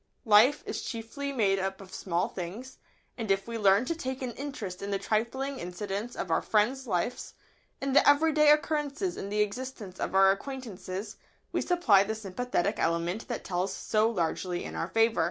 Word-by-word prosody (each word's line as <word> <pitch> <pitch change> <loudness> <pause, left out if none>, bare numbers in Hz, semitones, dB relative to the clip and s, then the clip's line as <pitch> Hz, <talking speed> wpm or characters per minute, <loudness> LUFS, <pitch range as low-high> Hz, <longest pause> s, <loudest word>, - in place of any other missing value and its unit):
] - - -42
Life 225 +7 +6
is - - -4
chiefly 245 +5 -5
made 200 -7 +2
up 190 0 -3
of 190 -1 -12
small 175 0 -1
things, 200 +9 -7 0.4
and 225 -2 -3
if 195 +1 +1
we 230 -1 -4
learn 200 +3 +4
to 335 - -1
take 260 -5 -5
an 250 - -2
interest 230 -9 -6
in 200 - -4
the 200 - 0
trifling 260 +7 -1
incidents 200 +6 -4
of 180 - -4
our - - +3
friends' 245 +5 +1
lives, 205 +5 -2 0.4
in 275 -1 -2
the 285 - +6
everyday 300 +1 +5
occurrences 300 +3 +1
in 200 - -5
the 210 +1 +1
existence 210 -3 -4
of - - -2
our 195 0 +7
acquaintances, 205 -4 -6 0.3
we - - 0
supply 300 - +4
the 220 +2 -3
sympathetic 210 -1 -2
element 170 +5 -1
that 240 - -4
tells 185 +1 -1
so 215 +1 +1
largely 175 -2 -2
in - - -7
our - - -2
favour. 225 0 +2
220 Hz, 185 wpm, -29 LUFS, 195-265 Hz, 0.4 s, our